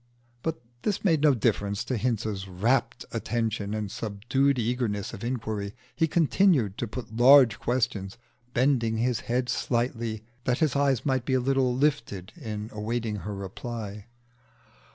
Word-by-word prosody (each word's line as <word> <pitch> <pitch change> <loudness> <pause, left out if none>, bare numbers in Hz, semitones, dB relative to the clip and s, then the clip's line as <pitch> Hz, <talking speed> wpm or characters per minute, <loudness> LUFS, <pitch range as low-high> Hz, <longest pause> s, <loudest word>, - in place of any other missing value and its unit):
But 160 +3 -2 0.2
this 205 -3 -1
made 160 -6 +4
no 150 -3 +5
difference 100 -2 0
to 130 - -2
Hinze's 110 -4 -1
rapt 115 +7 0
attention 110 -2 -2
and 105 -3 -3
subdued 120 +7 0
eagerness 115 -4 -1
of 95 - -8
inquiry. 110 -4 -3 0.2
He 160 - +2
continued 160 - +3
to 120 - -1
put 110 0 -7
large 125 -3 +7
questions, 110 -4 -1 0.3
bending 120 -3 +2
his 120 0 +1
head 125 +1 -1
slightly 115 -3 -1 0.2
that 125 -1 +2
his 155 -5 +1
eyes 140 -4 +2
might 130 -3 +1
be 130 +1 0
a - - +3
little 130 -1 +2
lifted 130 -10 0
in 110 -7 -6
awaiting 110 0 -2
her 105 +1 -5
reply. 105 +1 -6
120 Hz, 145 wpm, -27 LUFS, 105-130 Hz, 0.3 s, large